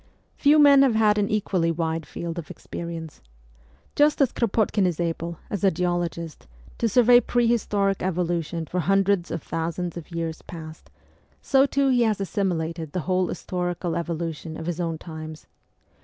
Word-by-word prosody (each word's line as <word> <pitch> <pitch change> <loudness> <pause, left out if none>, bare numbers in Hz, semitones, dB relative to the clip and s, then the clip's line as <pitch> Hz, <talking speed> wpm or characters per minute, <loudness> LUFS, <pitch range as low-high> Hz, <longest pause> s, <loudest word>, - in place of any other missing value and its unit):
Few 295 +1 +4
men 285 -2 +7
have 265 -5 +4
had 210 -1 +4
an 200 - 0
equally 190 -5 0
wide 165 -1 -2
field 170 0 -5
of 160 - -9
ex - - -12
perience. 165 -2 -6 0.7
Just 295 +1 +3
as 275 -4 +3
Kropotkin 215 -3 +1
is 175 -2 -2
able, 170 0 -2
as 205 -2 -3
a 195 - +6
geologist, 175 -2 -3 0.3
to 230 - +1
survey 245 +2 +6
prehistoric 220 -5 +1
evolution 170 -2 -1
for 180 +4 -3
hundreds 195 0 +2
of 160 - -4
thousands 170 +1 -3
of 170 - -9
years 165 -2 -4
past, 160 -2 -10 0.5
so 270 +1 +3
too 275 0 +1
he 250 -2 +3
has 220 -3 +2
assimilated 170 -6 -2
the 180 - -1
whole 185 +1 +1
historical 175 -1 -3
evolution 165 -1 -4
of 160 - -6
his 175 0 -3
own 165 -2 -2
times. 155 -1 -9
175 Hz, 160 wpm, -24 LUFS, 165-210 Hz, 0.7 s, men